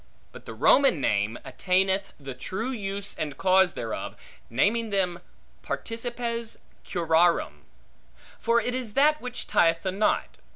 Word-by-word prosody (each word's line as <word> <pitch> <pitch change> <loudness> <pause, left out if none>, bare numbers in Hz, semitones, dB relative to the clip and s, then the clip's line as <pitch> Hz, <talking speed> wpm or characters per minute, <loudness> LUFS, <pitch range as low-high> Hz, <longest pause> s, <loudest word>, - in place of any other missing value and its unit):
But - - -13
the - - -7
Roman 275 - +4
name 105 -2 0
attaineth 190 +1 0
the 135 -2 -7
true 215 - -4
use 200 -4 -4
and 150 -3 -4
cause 190 -1 +4
thereof, 115 -1 -5 0.3
naming 215 - +1
them 185 -4 0 0.4
participes 235 0 -4 0.2
curarum; 165 - +1 0.7
for 235 +1 +3
it 245 - -2
is 250 -5 -4
that 300 +2 +4
which 250 0 -5
tieth 165 -1 +2
the 190 - -1
knot. 200 +3 0
195 Hz, 130 wpm, -26 LUFS, 165-230 Hz, 0.7 s, Roman